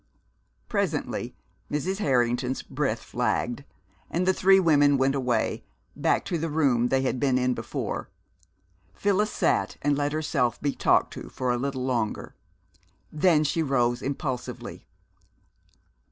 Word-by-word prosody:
Presently - - -2 0.4
Mrs. 185 +7 -1
Harrington's 125 - +1
breath 135 -5 -2
flagged, 120 +2 -1 0.5
and 175 +2 0
the 190 - +4
three 195 +1 +5
women 145 -5 +4
went 135 +1 +2
away, 125 -3 0 0.3
back - - +1
to 170 - -2
the 165 +1 -2
room 135 -6 +2
they 135 +1 +1
had 130 -1 -1
been 135 -2 +2
in 125 0 +1
before. - - -4 0.9
Phyllis 205 - +1
sat - - 0
and 145 0 +2
let 145 0 0
herself 150 -6 0
be 145 -1 -1
talked - - +2
to - - -8
for 125 -1 -2
a 120 - +1
little 130 -1 -2
longer. 120 -5 -2 0.8
Then 155 0 +3
she 160 +2 0
rose 120 -5 +1
impulsively. 135 -2 -5
135 Hz, 135 wpm, -26 LUFS, 125-155 Hz, 0.9 s, three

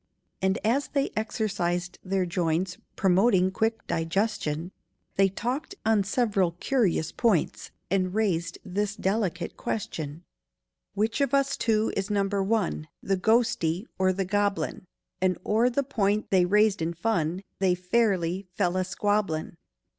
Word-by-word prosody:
And 190 +2 +2
as 260 +6 +2
they 280 -2 0
exercised 180 -5 -2
their 190 -1 0
joints, 175 +1 -1 0.2
Promoting 190 0 +3
quick 225 +3 -1
digestion, 165 -2 -1 0.4
They 195 0 +4
talked 255 - -3
on 220 -2 +4
several 200 -5 +1
curious 190 - +1
points, 215 -10 +1 0.2
And 185 -2 +1
raised 170 -6 0
this 205 +2 -1
delicate 190 -4 -1
question: 160 -6 -4 0.7
"Which 220 +6 0
of 280 -1 +2
us 275 0 +2
two 220 -1 +1
is 195 +1 -2
Number 200 -1 +1
One— 195 -6 0 0.2
The 195 - +1
ghostie, 215 -4 +2
or 185 0 +4
the 190 +1 -1
goblin?" 205 -1 -1 0.3
And 185 -1 +2
o'er 225 +4 +3
the 280 +3 0
point 215 -6 0
they 185 -2 +5
raised 210 0 +3
in 165 +1 -1
fun 175 -2 0 0.2
They 185 -2 +3
fairly 185 -2 +1
fell 180 +1 +1
a 185 - +2
squabblin'. 195 -4 -1
195 Hz, 135 wpm, -27 LUFS, 180-220 Hz, 0.7 s, they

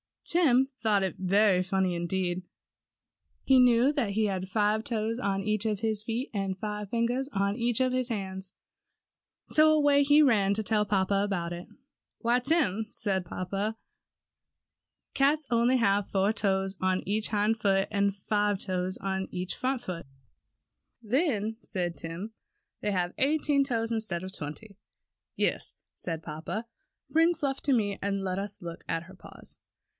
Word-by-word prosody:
Tim 270 -6 +3
thought 215 -3 +3
that 190 -1 -2
very 190 0 +3
funny 190 0 0
indeed. 175 +1 -2 1.0
He 265 -1 +5
knew 250 +2 +5
that 275 -9 -1
he 215 +2 +1
had 190 -2 -2
five 210 +2 +1
toes 225 0 -2
on 195 -4 -1
each 215 +1 +1
of 210 -2 -1
his 220 -2 0
feet, 235 +5 -3
and 195 -2 -2
five 210 0 -4
fingers 240 +4 0
on 200 +2 0
each 240 0 +1
of 255 0 +2
his 255 -1 0
hands, 190 -3 -4 1.0
so 310 0 +5
away 290 -2 +4
he 290 +2 +6
ran 210 -8 +4
to 215 +2 -1
tell 210 0 +1
papa 195 0 +1
about 175 -4 -2
it. 175 +1 -8 0.6
^Why, 240 +2 +3
Tim,'^ 250 - +1
said 190 -3 -1
papa, 195 +6 -3 1.4
^^cats 285 +3 +2
only 240 +2 +4
have 200 -4 +2
four 195 +1 +2
toes 195 -3 0
on 185 0 +1
each 210 +3 0
hind 215 +1 +1
foot 195 -2 +2
and 200 -1 +1
five 205 0 0
toes 185 -1 -2
on 190 -1 -2
each 180 0 -3
front 260 0 -1
foot.'^ 170 -5 -6 0.9
TIM'S 215 -2 -15
CAT. 270 - +2
47 - - -4
^Then/' - - -13
said 175 -4 -2
Tim, 170 +7 -6 0.5
^They 210 - 0
have 180 -2 -1
eighteen 285 0 +2
toes 230 -3 -1
instead 215 -6 -2
of 185 - -6
twenty.'' 190 +5 -7 0.6
^^Yes," - - 0 0.2
said 165 -2 -5
papa. 165 +9 -5 0.5
^^Bring 330 +2 +4
Fluff 275 -2 -2
to 280 - +2
me 205 -5 0
and 200 -1 -1
let 185 0 -2
us 200 0 -5
look 170 -1 -8
at 165 - -1
her 185 +2 -14
paws." - - -10
205 Hz, 165 wpm, -29 LUFS, 190-235 Hz, 1.4 s, he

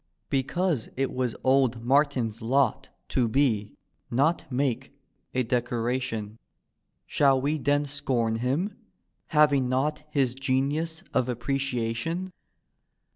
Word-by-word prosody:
Because 140 +1 0
it 135 0 0
was 125 -3 -1
old 130 -3 +3
Martin's 130 -5 +2
lot 130 +4 +1 0.2
To 125 -2 +2
be, 110 -4 +1 0.3
not 140 +4 +1
make, 135 +1 -1 0.4
a 130 - +2
decoration. 120 -2 -2 0.7
Shall 135 -2 +3
we 145 +4 0
then 145 +2 +2
scorn 130 -6 -1
htm, 145 - 0 0.5
having 145 -4 +4
not 150 +4 0
His 135 -5 +1
genius 140 +5 -1
of 125 - +1
appreciation? 130 +7 -2
130 Hz, 105 wpm, -27 LUFS, 120-145 Hz, 0.7 s, having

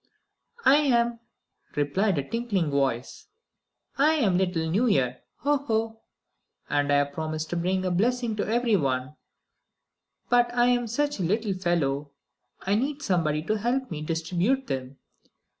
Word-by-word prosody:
"I 275 - +7
am," 235 -5 +2 0.6
replied 170 +6 +1
a 140 -1 -2
tinkling 210 -9 -1
voice. 135 -3 -1 0.7
"I 305 +3 +5
am 205 - +2
the 190 - +2
little 165 -2 -2
New 205 +10 +2
Year, 125 - +1 0.2
ho! 290 +1 +2
ho! 225 -4 -2 0.7
And 145 0 +1
I've 145 0 +2
promised 155 0 -4
to - - -1
bring 185 +2 0
a 185 - 0
blessing 235 +4 +1
to - - -1
everyone. 155 - 0 1.1
But 240 0 +3
I 245 0 +4
am 245 -1 +1
such 290 +3 -1
a - - -1
little 205 +4 0
fellow 150 -6 -1 0.5
I 195 - 0
need 280 +6 -1
somebody 155 - 0
to 215 +4 -1
help 250 +3 -1
me 150 -2 -4
distribute 175 - 0
them. 130 - -5
190 Hz, 145 wpm, -26 LUFS, 155-240 Hz, 1.1 s, I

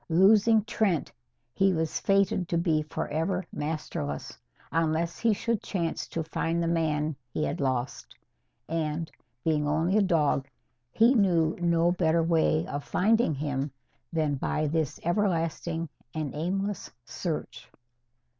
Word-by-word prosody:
Losing 210 +5 +5
Trent, 200 -6 0 0.4
he 195 +3 +3
was 160 -2 -1
fated 195 -2 +2
to 170 - +1
be 165 -3 +2
forever 165 +4 -2
masterless, 145 - -4 0.4
unless 165 +1 0
he 230 - +3
should 225 +1 -1
chance 170 -4 -2
to 165 - -3
find 165 +1 -1
the - - 0
man 155 -2 0 0.2
he 155 - -1
had 150 +4 -2
lost. 130 -2 -2 0.5
And, 160 0 -2 0.3
being 150 -2 +1
only 165 +7 +2
a - - +5
dog, 150 -7 +2 0.4
he 230 - +5
knew 175 -8 +3
no 170 0 +3
better 170 -2 +2
way 160 -1 +2
of 145 0 -4
finding 220 -4 +2
him 140 0 -2 0.4
than 155 -3 +1
by 155 +3 -1
this 155 -1 -1
everlasting 170 -3 0 0.3
and 155 -3 -3
aimless 195 +6 -2 0.2
search. 125 - -5
165 Hz, 130 wpm, -28 LUFS, 155-185 Hz, 0.5 s, Losing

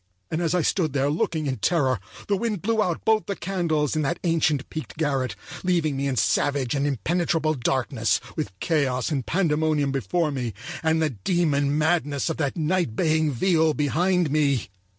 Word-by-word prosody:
And 160 - -1
as 170 +1 +1
I 175 - +2
stood 160 -5 +1
there 140 0 +1
looking 155 0 -1
in 130 -2 -1
terror, 130 - +1 0.3
the 205 - +2
wind 215 -3 -2
blew 225 +1 +1
out 180 -5 -1
both 220 -1 +2
the 200 - -2
candles 170 -6 -1
in 155 - +1
that 160 +4 -1
ancient 160 -5 +1
peaked 155 -1 -6
garret, 140 -5 0 0.3
leaving 170 -5 +1
me 140 +1 -1
in 135 - -1
savage 135 +1 +1
and 140 0 0
impenetrable 160 +3 0
darkness 120 -5 0 0.2
with 95 - -3
chaos 140 -5 0
and 135 -4 -1
pandemonium 155 -3 +1
before 145 - 0
me, 125 -7 -3 0.3
and 160 0 +2
the 155 - +1
demon 145 - +1
madness 155 -2 +1
of - - -4
that 145 +1 -1
night 165 -6 0
baying 155 -1 +2
viol 160 +2 +2
behind 175 +2 +1
me. 140 -6 +1
155 Hz, 175 wpm, -24 LUFS, 140-170 Hz, 0.3 s, I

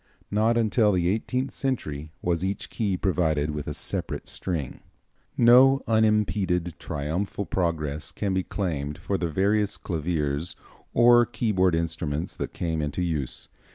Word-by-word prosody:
Not 110 +3 +2
until 110 -2 +3
the 90 -2 +1
eighteenth 125 +6 -1
century 80 - -3
was 85 0 0
each 95 +1 -3
key 100 -5 -1
provided 80 -6 +1
with 75 -1 -5
a 75 - -2
separate - - -4
string. 80 -8 -4 0.6
No 130 +3 +6
unimped 105 -6 +1
triumphal 85 +8 -3
progress 75 -6 -2
can 100 -2 -2
be 95 - +1
claimed 75 -7 -3
for 100 - -2
the 85 - -1
various 100 +5 +1
claviers 80 -2 -2 0.4
or 120 0 +6
keyboard 95 -8 +1
instruments 80 -1 -2
that - - -4
came 80 -2 -2
into 75 +4 -2
use. 75 -7 -2
90 Hz, 135 wpm, -26 LUFS, 80-105 Hz, 0.6 s, No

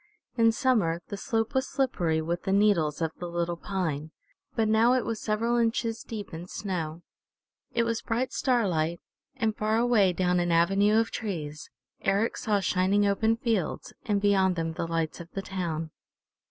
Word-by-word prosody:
In 230 -2 +5
summer 205 -9 +1
the - - -4
slope 225 +1 -1
was 265 0 0
slippery 170 - 0
with 170 +2 -2
the 190 - -2
needles 185 -7 +3
of 160 - 0
the 175 - -4
little 170 0 -1
pine, 165 -5 -3 0.5
but 225 -2 +2
now 225 +3 +4
it 255 -2 +1
was 225 -2 -3
several 230 +2 0
inches 230 0 0
deep 210 -5 -7
in 165 +2 -7
snow. 170 -5 -4 0.7
It 235 - +2
was 230 -1 -1
bright 250 +3 -2
starlight, 175 - +1 0.4
and 225 -5 0
far 215 +1 +1
away 230 -5 +4
down 180 0 +1
an 175 0 0
avenue 195 +6 +4
of 225 - 0
trees, 155 -8 -5 0.3
Eric 205 +4 +1
saw 205 -2 0
shining 190 +2 +2
open 220 +3 +2
fields, 225 -8 -2
and 205 -3 +1
beyond 195 -2 +3
them 165 -1 -2
the 165 - -3
lights 165 -1 -2
of 170 0 -9
the 195 - -4
town. 165 -5 -3
200 Hz, 170 wpm, -28 LUFS, 170-225 Hz, 0.7 s, In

